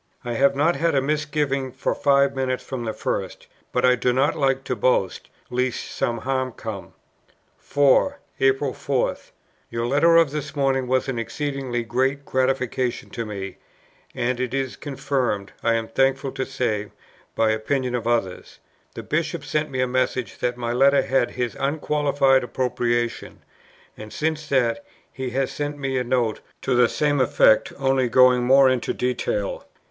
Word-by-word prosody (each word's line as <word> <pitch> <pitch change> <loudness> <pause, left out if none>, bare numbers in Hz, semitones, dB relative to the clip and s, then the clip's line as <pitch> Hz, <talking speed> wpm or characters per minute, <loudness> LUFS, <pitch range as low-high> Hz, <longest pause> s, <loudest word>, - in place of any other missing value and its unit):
"I 120 - -2
have 140 +3 +3
not 160 +5 +2
had 165 -2 +1
a - - +4
misgiving 145 -2 -1
for 130 +1 -2
five 140 -1 +3
minutes 130 -1 -1
from 125 -3 -5
the 110 - -1
first: 95 -3 -4 0.3
but - - +1
I 125 - +6
do 125 0 +1
not 135 +4 +2
like 135 -2 +1
to 130 - -2
boast, 100 -4 0 0.2
lest 125 0 -2
some 120 - -1
harm 130 0 -2
come." 110 -4 -7 0.7
4. 145 - +3 0.2
April 135 0 +2
4. 135 -3 -1 0.5
"Your 115 0 -2
letter 145 +7 +4
of 165 -4 +5
this 150 0 -5
morning 135 -2 +1
was 130 +2 +1
an 130 -3 -2
exceedingly 135 -1 -3
great 130 +5 -1
gratification 130 -1 -1
to 115 -2 -4
me; 100 -2 -6 0.6
and 120 +1 -1
it 130 0 -2
is 135 -2 -2
confirmed, 130 -8 -2
I 115 0 +2
am 115 -1 -2
thankful 135 +3 +1
to 130 - -4
say, 110 -6 -2 0.5
by 110 -1 +2
the 110 - +2
opinion 125 +3 -1
of 120 -2 -2
others. 115 -6 -2 0.4
The - - -6
Bishop 165 -1 -2
sent 150 +2 -1
me 130 -1 -2
a 130 - +1
message 130 -1 -1
that 120 0 -1
my 120 -1 -2
Letter 140 +3 +4
had 125 -1 +1
his 125 -3 -3
unqualified 140 -2 +2
approbation; 120 -1 -2 0.5
and 110 0 -10
since 155 -1 -2
that, 120 -4 +1 0.3
he 130 -1 -4
has 135 +2 -1
sent 145 0 -4
me 135 -2 -1
a - - -1
note 120 -3 0 0.2
to - - 0
the 120 -1 +4
same 145 -2 +1
effect, 120 -3 +4
only 135 -2 +1
going 125 0 +5
more 135 +2 +6
into 130 -2 0
detail. 120 -5 -2
130 Hz, 165 wpm, -23 LUFS, 120-140 Hz, 0.7 s, I